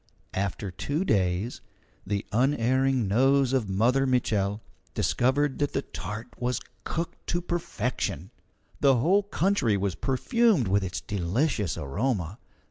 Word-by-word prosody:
After 100 Hz, 0 st, -2 dB
two 150 Hz, -, -2 dB
days, 95 Hz, -, 0 dB, 0.5 s
the 100 Hz, 0 st, -1 dB
unerring 130 Hz, 0 st, +2 dB
nose 135 Hz, +5 st, +3 dB
of 120 Hz, -7 st, +1 dB
Mother 125 Hz, +8 st, +2 dB
Mitchel 105 Hz, -5 st, +1 dB, 0.4 s
discovered 135 Hz, +3 st, +1 dB
that 145 Hz, -1 st, 0 dB
the 135 Hz, -, -1 dB
tart 110 Hz, +3 st, -6 dB
was 125 Hz, -1 st, 0 dB, 0.2 s
cooked 165 Hz, +1 st, -4 dB
to 175 Hz, -, 0 dB
perfection. 125 Hz, -, -3 dB, 0.5 s
The 135 Hz, -2 st, +5 dB
whole 175 Hz, -, +3 dB
country 190 Hz, -, +1 dB
was 100 Hz, -1 st, -1 dB
perfumed 185 Hz, -, +2 dB
with 100 Hz, +1 st, +2 dB
its 90 Hz, -1 st, -4 dB
delicious 105 Hz, -, -1 dB
aroma. 100 Hz, -, -2 dB
125 Hz, 125 wpm, -27 LUFS, 100-140 Hz, 0.5 s, The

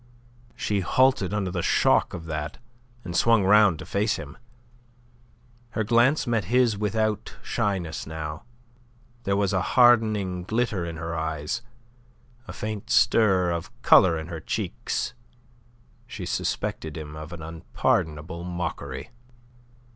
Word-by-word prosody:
She 105 Hz, -1 st, -1 dB
halted 115 Hz, +1 st, +2 dB
under 100 Hz, -3 st, -1 dB
the 90 Hz, -1 st, -2 dB
shock -, -, +2 dB
of 85 Hz, -, -8 dB
that, 75 Hz, -1 st, -4 dB, 0.5 s
and 85 Hz, -2 st, -6 dB
swung 115 Hz, -1 st, +4 dB
round 100 Hz, -3 st, +5 dB
to -, -, -9 dB
face 105 Hz, +2 st, 0 dB
him. 70 Hz, -3 st, -8 dB, 1.4 s
Her 110 Hz, -, +2 dB
glance 120 Hz, +8 st, +3 dB
met 115 Hz, -6 st, 0 dB
his 120 Hz, +2 st, +3 dB
own 100 Hz, -, -8 dB
without 110 Hz, 0 st, -1 dB
shyness 90 Hz, -7 st, -2 dB
now; 80 Hz, -1 st, -5 dB, 0.8 s
there 100 Hz, -, +1 dB
was 100 Hz, -1 st, +1 dB
a 95 Hz, -, +2 dB
hardening 110 Hz, -7 st, +3 dB
glitter 105 Hz, -3 st, -1 dB
in 85 Hz, -1 st, -6 dB
her 85 Hz, +1 st, -4 dB
eyes, 80 Hz, +5 st, -3 dB, 0.9 s
a -, -, -6 dB
faint 105 Hz, -1 st, -5 dB
stir 95 Hz, -6 st, +4 dB
of 85 Hz, -1 st, -3 dB
colour 85 Hz, -3 st, +6 dB
in 80 Hz, -, -5 dB
her 85 Hz, -2 st, -5 dB
cheeks. -, -, -3 dB, 0.9 s
She -, -, -7 dB
suspected 80 Hz, 0 st, -3 dB
him 75 Hz, -1 st, -7 dB
of 75 Hz, +1 st, -8 dB
an 85 Hz, -2 st, -8 dB
unpardonable 80 Hz, 0 st, -2 dB
mockery. 85 Hz, -, -5 dB
90 Hz, 130 wpm, -25 LUFS, 80-110 Hz, 1.4 s, colour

